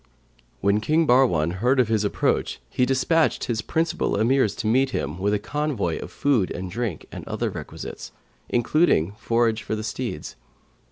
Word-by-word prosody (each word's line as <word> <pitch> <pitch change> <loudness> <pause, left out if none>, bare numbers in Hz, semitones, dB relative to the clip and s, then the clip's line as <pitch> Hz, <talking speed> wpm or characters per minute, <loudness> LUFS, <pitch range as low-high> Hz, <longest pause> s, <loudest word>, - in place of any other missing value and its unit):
When 100 +1 +3
King 155 +8 +2
Bahrwan 90 - +3
heard 125 +6 +2
of 125 - +4
his 110 -2 +1
approach, 105 - 0
he 125 - +1
despatched 145 +5 +2
his 115 -2 -1
principal 165 0 0
Emirs 120 0 +2
to - - -4
meet 130 +5 +3
him,[FN#537] 75 - -3
with 100 +2 +1
a - - +2
convoy 125 - -2
of - - -7
food 130 -10 +1
and 90 0 -5
drink 115 -6 -3
and - - -7
other - - -2
requisites, - - -8 0.4
including 120 - +2
forage 115 -1 +1
for - - -3
the 110 - -4
steeds. 105 -6 -5
115 Hz, 165 wpm, -24 LUFS, 100-135 Hz, 0.4 s, of